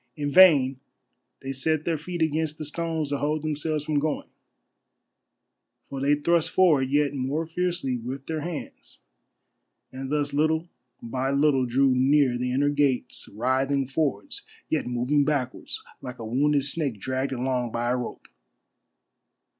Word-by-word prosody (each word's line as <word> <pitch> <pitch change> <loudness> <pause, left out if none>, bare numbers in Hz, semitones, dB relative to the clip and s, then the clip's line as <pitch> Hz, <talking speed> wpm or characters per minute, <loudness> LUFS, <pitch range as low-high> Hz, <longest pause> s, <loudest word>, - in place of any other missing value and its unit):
In 145 -1 -2
vain 140 -7 +6 0.6
they 135 - -4
set 155 +3 -1
their 170 - +1
feet 175 +1 -2
against 160 0 -1
the 155 - -5
stones 160 0 -2
to 140 -1 -1
hold 150 +1 -1
themselves 155 0 -1
from 150 -1 +1
going, 150 +1 -2 1.6
for 135 -1 -5
they 145 +2 +3
thrust 165 +2 +1
forward 155 -8 +3
yet 145 0 +2
more 140 +4 -2
fiercely 170 -6 -1
with 130 +3 -6
their 160 -1 -3
hands, 165 0 -7 0.9
and 130 0 -6
thus 145 -1 0
little 160 +3 +1 0.4
by 130 +3 -2
little 140 -2 +2
drew 130 +2 +3
near 130 0 +3
the 125 +1 -2
inner 140 +3 +2
gates 145 -3 0
writhing 130 +5 0
forwards 155 - -2 0.3
yet 155 - 0
moving 125 +4 +1
backwards 140 -4 -2 0.2
like 125 -1 -7
a 115 - -7
wounded 140 +5 +2
snake 140 -5 0
dragged 130 +6 -2
along 125 -1 -1
by 120 +1 -1
a - - +2
rope. 125 -1 -6
140 Hz, 145 wpm, -26 LUFS, 130-155 Hz, 1.6 s, vain